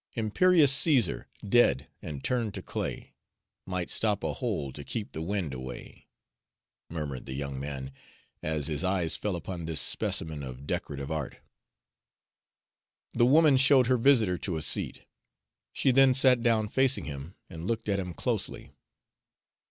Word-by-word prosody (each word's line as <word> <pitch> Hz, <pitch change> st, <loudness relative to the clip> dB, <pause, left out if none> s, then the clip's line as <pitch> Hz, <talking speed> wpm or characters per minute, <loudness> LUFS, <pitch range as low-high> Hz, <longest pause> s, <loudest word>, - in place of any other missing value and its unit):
"Imperious 145 Hz, -, +4 dB
Caesar, 140 Hz, -4 st, +3 dB, 0.2 s
dead, 70 Hz, -, +3 dB
and 75 Hz, -4 st, -7 dB
turned 115 Hz, -5 st, -1 dB
to -, -, -6 dB
clay, -, -, -5 dB, 0.5 s
Might 90 Hz, -2 st, -2 dB
stop 105 Hz, -2 st, +1 dB
a -, -, -1 dB
hole 95 Hz, -, -3 dB
to 75 Hz, -, -8 dB
keep 105 Hz, +7 st, -5 dB
the 80 Hz, -, -6 dB
wind 90 Hz, -4 st, -2 dB
away," 65 Hz, -1 st, -9 dB, 0.8 s
murmured 75 Hz, -6 st, -5 dB
the 65 Hz, -, -5 dB
young 70 Hz, -1 st, -4 dB
man, 70 Hz, -1 st, -5 dB, 0.5 s
as 75 Hz, -2 st, -1 dB
his 75 Hz, +1 st, -2 dB
eye 95 Hz, -2 st, +1 dB
fell 100 Hz, +3 st, -1 dB
upon 85 Hz, 0 st, -6 dB
this 80 Hz, -2 st, 0 dB
specimen 80 Hz, -2 st, 0 dB
of 65 Hz, 0 st, -8 dB
decorative 70 Hz, 0 st, -4 dB
art. 75 Hz, -4 st, -3 dB, 1.8 s
The 120 Hz, -, +4 dB
woman 150 Hz, 0 st, +6 dB
showed 130 Hz, -1 st, +5 dB
her 130 Hz, +1 st, +3 dB
visitor 115 Hz, -8 st, +3 dB
to 90 Hz, -5 st, -3 dB
a 80 Hz, -, -3 dB
seat. -, -, -2 dB, 0.7 s
She 135 Hz, -, +2 dB
then 135 Hz, 0 st, +5 dB
sat 130 Hz, -2 st, +5 dB
down 115 Hz, -3 st, +2 dB
facing 135 Hz, +2 st, +1 dB
him 70 Hz, +4 st, -7 dB
and 85 Hz, 0 st, -8 dB
looked 115 Hz, 0 st, -2 dB
at 100 Hz, -1 st, +1 dB
him 90 Hz, -3 st, -5 dB
closely. -, -, -3 dB
95 Hz, 150 wpm, -28 LUFS, 75-120 Hz, 1.8 s, woman